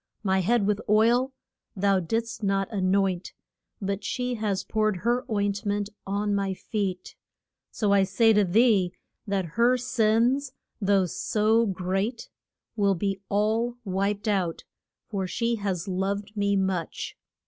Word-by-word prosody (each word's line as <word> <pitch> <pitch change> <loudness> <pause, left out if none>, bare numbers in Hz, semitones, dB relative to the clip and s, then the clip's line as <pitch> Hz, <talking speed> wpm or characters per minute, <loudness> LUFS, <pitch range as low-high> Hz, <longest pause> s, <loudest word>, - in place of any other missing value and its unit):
My 190 -2 +2
head 210 +3 +2
with 210 +1 +1
oil 235 +5 +4 0.4
thou 195 0 +2
didst 225 +7 -2
not 195 -1 +1
an 185 -2 +1
oint, 195 -2 0 0.5
but 200 -1 -3
she 250 +3 -2
has 210 -4 -1
poured 215 -3 0
her 240 +2 +2
oint 205 -2 0
ment 205 0 -1 0.2
on 205 +1 0
my 195 -1 0
feet. 190 -3 -4 0.5
So 205 -3 +1
I 200 - +5
say 205 +4 +4
to 210 -1 +4
thee 195 -2 +3 0.3
that 195 -2 0 0.2
her 250 +2 +5
sins, 245 +3 +1 0.3
though 195 -1 +3
so 220 +6 +1
great, 195 +5 -2 0.5
will 200 -3 +2
be 195 +2 -2
all 220 +4 +1
wiped 200 +2 -1
out, 185 -5 0 0.4
for 195 -3 -2
she 235 +4 -1
has 195 -4 -3
loved 200 +3 -2
me 200 -1 +1
much. 190 -4 -2
200 Hz, 140 wpm, -26 LUFS, 195-225 Hz, 0.5 s, I